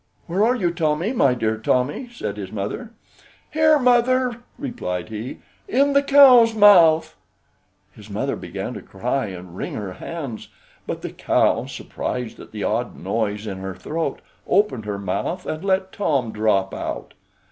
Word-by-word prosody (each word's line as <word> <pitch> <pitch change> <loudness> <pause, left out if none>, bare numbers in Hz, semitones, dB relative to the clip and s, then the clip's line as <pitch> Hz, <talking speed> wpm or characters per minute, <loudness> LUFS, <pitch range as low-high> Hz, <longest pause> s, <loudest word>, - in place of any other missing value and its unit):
"Where 185 +4 0
are 240 +3 +3
you, 180 -8 0
Tommy, 165 +5 0
my 140 - +3
dear 110 -2 -1
Tommy?" 130 - 0
said 235 - -5
his 95 -2 -6
mother. 105 - -4 0.6
"Here, 310 0 +4
mother," 250 -1 +3 0.2
replied 235 - -4
he, 110 +4 -6 0.3
"in 280 +3 +2
the 280 - +5
cow's 260 -5 +7
mouth." 175 -7 +6 0.8
His - - -14
mother - - -2
began - - -6
to - - -7
cry 125 +5 -2
and 90 -2 -9
wring - - -5
her 100 -4 -5
hands; 135 - -6 0.4
but - - -4
the - - -4
cow, - - +1
surprised 125 -3 -5
at - - -12
the 105 -2 -5
odd 120 +3 -1
noise 105 -2 -2
in 95 -3 -5
her 95 -1 -5
throat, 160 -3 -3 0.3
opened 185 - +2
her 105 -1 -3
mouth 100 - -3
and 155 +3 -4
let 190 -1 0
Tom 140 - 0
drop 105 -3 +1
out. - - -5
150 Hz, 160 wpm, -22 LUFS, -, 0.8 s, cow's